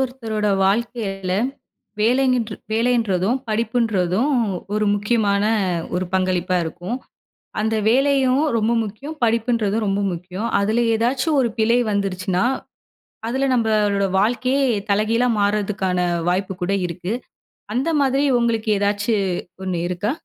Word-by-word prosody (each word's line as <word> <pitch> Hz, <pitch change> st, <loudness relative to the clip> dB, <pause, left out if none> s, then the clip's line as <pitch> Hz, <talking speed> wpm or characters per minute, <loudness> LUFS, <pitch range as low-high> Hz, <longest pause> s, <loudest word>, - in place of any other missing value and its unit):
ஒருத்தரோட 230 Hz, -5 st, -2 dB, 0.2 s
வாழ்க்கையில 195 Hz, -3 st, -1 dB, 0.7 s
வேலைங்கின்று 245 Hz, -1 st, +2 dB, 0.2 s
வேலைன்றதும், 225 Hz, -2 st, +1 dB
படிப்புன்றதும் 220 Hz, +1 st, +1 dB, 0.4 s
ஒரு 215 Hz, 0 st, +1 dB
முக்கியமான 205 Hz, -1 st, +1 dB, 0.5 s
ஒரு 180 Hz, +1 st, 0 dB
பங்களிப்பா 185 Hz, -1 st, +1 dB
இருக்கும். 175 Hz, +8 st, -4 dB, 0.6 s
அந்த 220 Hz, +1 st, 0 dB
வேலையும் 270 Hz, +2 st, +3 dB
ரொம்ப 225 Hz, +1 st, +1 dB
முக்கியம், 245 Hz, +9 st, -7 dB
படிப்புன்றதும் 225 Hz, -2 st, +1 dB
ரொம்ப 195 Hz, +1 st, 0 dB
முக்கியம். 180 Hz, +5 st, -5 dB
அதுல 215 Hz, +4 st, +1 dB
ஏதாச்சும் 260 Hz, +7 st, +1 dB
ஒரு 240 Hz, -, +1 dB
பிழை 230 Hz, +2 st, +3 dB
வந்துருச்சுன்னா, 190 Hz, -2 st, -1 dB, 0.8 s
அதுல 265 Hz, +3 st, 0 dB
நம்பளோட 210 Hz, -4 st, +2 dB
வாழ்க்கையே 250 Hz, +6 st, +1 dB, 0.3 s
தலைகீழா 220 Hz, +4 st, +2 dB
மார்றதுக்கான 200 Hz, -3 st, 0 dB, 0.3 s
வாய்ப்பு 190 Hz, +2 st, -1 dB
கூட 180 Hz, +2 st, -1 dB, 0.2 s
இருக்கு. 180 Hz, +4 st, -4 dB, 0.6 s
அந்த 260 Hz, +7 st, 0 dB
மாதிரி 275 Hz, +1 st, +2 dB, 0.2 s
உங்களுக்கு 230 Hz, -2 st, 0 dB
ஏதாச்சு 205 Hz, +2 st, +1 dB, 0.5 s
1 185 Hz, -2 st, -2 dB
இருக்கா? 180 Hz, +5 st, -1 dB
215 Hz, 105 wpm, -21 LUFS, 195-240 Hz, 0.8 s, வேலையும்